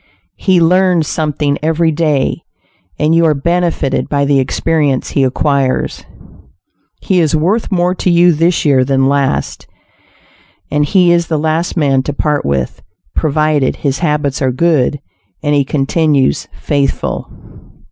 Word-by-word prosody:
He 190 -3 +2
learns 180 -1 +2
something 150 -2 -1
every 160 +1 +1
day; 150 -3 0 0.6
and 155 +2 +1
you 165 0 +3
are 155 -2 +2
benefited 170 -2 -1
by 140 -1 0
the 140 -1 +2
experience 145 0 -1
he 140 - +1
acquires. 135 0 -1 1.0
He 185 -2 +1
is 160 -2 +1
worth 190 +10 0
more 180 -1 +1
to 185 - -2
you 175 0 +5
this 165 +2 +1
year 135 -3 +3
than 135 0 +1
last, 140 -1 -1 1.0
and 145 0 +1
he 180 +2 +3
is 170 -1 +1
the 160 - -1
last 160 +4 -1
man 135 -4 +2
to 145 +3 -4
part 150 0 -1
with, 70 -3 -2 0.3
provided 155 -2 +1
his 140 -1 -2
habits 150 -4 -1
are 130 -1 +1
good, 145 -1 +1 0.4
and 145 -1 +1
he 145 -1 +3
continues 140 - 0
faithful. 140 -1 -2
150 Hz, 140 wpm, -14 LUFS, 140-170 Hz, 1.0 s, you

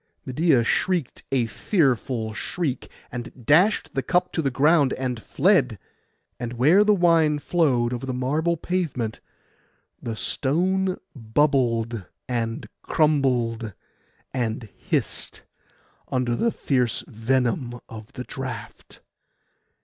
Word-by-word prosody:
Medeia 135 -1 +3
shrieked 175 0 0
a 130 -3 +2
fearful 125 - 0
shriek, 140 +3 -3 0.2
and 120 0 -8
dashed 160 - +4
the 135 - 0
cup 180 +7 +1
to 165 - 0
the 140 - +1
ground, 145 +1 +3
and 125 -3 -3
fled; 140 - +2 0.6
and 120 -1 -4
where 150 - +5
the 210 - +4
wine 165 -4 +4
flowed 135 -6 +1
over 125 +2 -4
the - - -1
marble 150 +7 0
pavement, 155 -11 -2 0.8
the 115 -2 -4
stone 185 +11 0 0.2
bubbled, 115 -3 +1 0.2
and 115 -2 -2
crumbled, 125 -8 +1 0.6
and 115 -3 -2
hissed, - - -2 0.6
under 125 -2 0
the 235 - +1
fierce 125 - 0
venom 120 - -1
of 110 -1 -10
the - - -5
draught. - - -8
130 Hz, 110 wpm, -24 LUFS, 120-160 Hz, 0.8 s, where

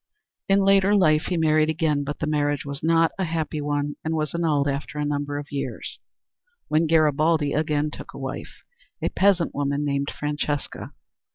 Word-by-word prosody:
In 195 0 +5
later 195 +1 +4
life 155 -6 +4
he 180 - -1
married 155 -1 +3
again 155 -2 +1
but 145 +1 -4
the - - -2
marriage 145 -1 0
was 140 0 -5
not 165 0 +3
a - - +1
happy 160 -3 -2
one 145 0 -2
and 160 +1 -1
was 155 -2 -2
annulled 155 -4 +1
after 140 +1 -3
a 150 - -1
number 145 0 -2
of 145 0 -7
years, 140 -1 -5 0.7
when 160 +2 +2
Garibaldi 155 -1 +3
again 150 -1 0
took - - -9
a - - -7
wife, - - -7 0.4
a - - -1
peasant 190 -4 +2
woman 145 +1 -1
named 140 0 -1
Francesca. 150 0 -3
150 Hz, 175 wpm, -24 LUFS, 145-160 Hz, 0.7 s, In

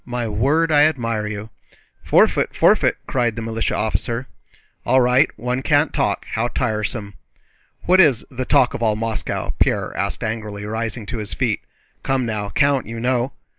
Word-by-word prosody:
My 120 -1 -3
word, 140 +10 +1
I 150 0 +6
admire 115 -8 -2
you!" 105 +1 -6 0.5
"Forfeit, - - +3
forfeit!" - - +3
cried 120 -4 0
the 115 - -5
militia 115 0 -2
officer. 115 +3 -1 0.6
"All 130 +2 +3
right, 125 +4 +4
one 125 +1 -2
can't 145 +1 +2
talk—how 110 +3 -1
tiresome!" 105 -1 -2 0.7
"What 185 +2 +4
is 135 -10 +3
'the 130 0 -4
talk 125 - +3
of - - -5
all 110 -2 +2
Moscow'?" 110 0 -3
Pierre - - +1
asked - - -2
angrily, 105 -2 -4
rising 110 +1 -4
to 115 +2 -5
his 105 -1 -4
feet. 120 -5 0 0.4
"Come 135 -2 0
now, 105 -3 -3
Count, 140 +3 +1
you 115 0 -6
know!" 125 +2 0
115 Hz, 160 wpm, -21 LUFS, 110-130 Hz, 0.7 s, I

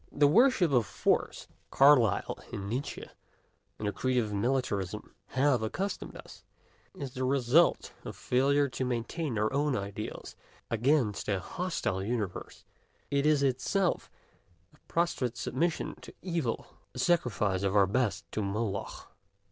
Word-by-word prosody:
The 145 - +3
worship 215 - +4
of 120 -5 +3
Force, - - 0
to - - -15
which - - -37
Carlyle 135 -7 +5
and 100 -1 -5
Nietzsche 125 +7 -4 0.7
and 105 - -3
the - - +1
creed 130 +4 -1
of 110 -4 0
Militarism 105 -3 -1
have 130 -2 +2
accustomed 190 - -3
us, - - -13 0.5
is 135 -3 -6
the 130 - -3
result 135 +5 +3
of - - -7
failure 140 +3 +2
to 130 - -4
maintain 125 +2 -2
our 110 +4 0
own 145 -1 +1
ideals 100 +1 -6 0.4
against 120 -1 +1
a 100 -2 +1
hostile 150 - -2
universe: 105 -4 -4 0.5
it 140 +1 +2
is 150 -2 +3
itself 165 +8 0 0.6
a - - -22
prostrate 135 -8 0
submission 165 +5 -1
to - - -12
evil, 165 -10 -2 0.3
a - - -7
sacrifice 105 - +1
of 100 0 0
our 100 -1 +6
best 100 -2 0
to 110 - -2
Moloch. 100 0 -3
125 Hz, 140 wpm, -30 LUFS, 105-145 Hz, 0.7 s, our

